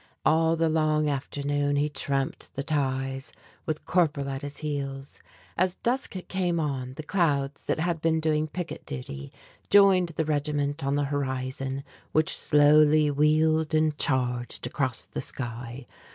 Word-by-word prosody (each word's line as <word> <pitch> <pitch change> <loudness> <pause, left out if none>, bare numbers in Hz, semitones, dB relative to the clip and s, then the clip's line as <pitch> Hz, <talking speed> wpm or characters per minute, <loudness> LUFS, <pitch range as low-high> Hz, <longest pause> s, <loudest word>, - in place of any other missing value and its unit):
All 160 +1 +4
the 165 0 +1
long 155 -1 +2
afternoon 145 0 -1
he 145 +1 +2
tramped 140 -2 -3
the 135 - -2
ties, 135 -2 -1 0.4
with 155 -1 -3
Corporal 150 -6 +1
at 135 0 -4
his 145 0 -7
heels. 140 -2 -5 0.4
As 185 +1 +1
dusk 245 -2 -2
came 180 -3 0
on 130 -4 -3
the 155 - -6
clouds 145 -5 0
that - - 0
had 165 -1 -1
been 160 -1 +2
doing 155 -1 +1
picket 175 +2 -6
duty, 70 +1 -6 0.4
joined 195 -3 +6
the 160 - 0
regiment 145 -1 -1
on 140 +1 0
the 145 - +1
horizon 135 -1 -3 0.3
which 155 0 +2
slowly 150 0 +5
wheeled 155 +2 +2
and 155 -1 +2
charged 125 -2 0
across - - -2
the - - -6
sky. 120 +1 -6
145 Hz, 145 wpm, -27 LUFS, 135-160 Hz, 0.4 s, joined